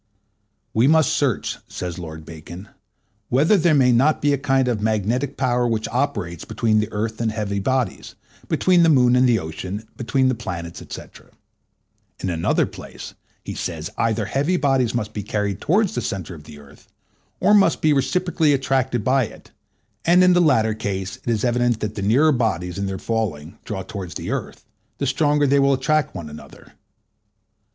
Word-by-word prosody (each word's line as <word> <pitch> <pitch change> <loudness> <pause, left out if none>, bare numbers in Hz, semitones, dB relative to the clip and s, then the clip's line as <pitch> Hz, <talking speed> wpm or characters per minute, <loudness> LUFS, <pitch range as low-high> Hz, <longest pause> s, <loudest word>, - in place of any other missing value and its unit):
We 115 +4 +3
must 160 -2 +4
search, - - -1
says 90 -1 -6
Lord 80 -2 -8
Bacon, 85 +5 -10 0.6
whether 145 - +4
there 170 -4 +3
may 130 -3 +4
not 135 +6 +3
be 145 0 +2
a - - +1
kind 135 -2 +1
of 115 -4 -1
magnetic 110 +6 -1
power 125 -2 +1
which 110 -2 -1
operates 105 - -2
between 110 0 +1
the 105 +1 -2
earth 110 +2 -3
and 115 -1 0
heavy 105 -2 -2
bodies, 130 0 -2 0.3
between 180 -2 +3
the 165 - +5
moon 125 -4 +5
and 125 0 +4
the 115 - +4
ocean, 95 +5 -6
between 130 +1 +1
the 130 - +2
planets, 85 -7 -6
&c. - - -6 1.2
In 95 - -2
another 85 -1 +1
place - - -10 0.3
he - - -5
says, 80 -2 -5
either 110 -2 0
heavy 140 - 0
bodies 135 -6 +1
must 110 -2 -3
be 105 - -3
carried 100 -1 -2
towards 200 +4 +2
the 120 - -2
centre 95 -4 -4
of 75 -2 -12
the 75 - -12
earth, 70 -1 -17 0.5
or 205 - +4
must 195 -5 +4
be 155 -1 +3
reciprocally 155 +3 +1
attracted 130 -3 0
by 130 +1 +2
it; - - -14 0.5
and 180 +2 +5
in 185 0 +6
the 175 - +4
latter 115 -9 +3
case 95 -3 -4
it - - -7
is 115 0 0
evident 120 -1 +1
that 105 -1 -3
the 105 - -5
nearer 130 +11 +4
bodies, 95 - -1
in 100 - -2
their 95 0 -3
falling, 100 -5 -3
draw 95 -3 -4
towards 95 -2 -7
the - - -4
earth, - - -5 0.3
the 140 - -2
stronger 145 +2 +2
they 140 0 +3
will 140 0 +4
attract 150 +2 0
one 85 -4 -6
another. 75 0 -13
115 Hz, 180 wpm, -22 LUFS, 100-135 Hz, 1.2 s, in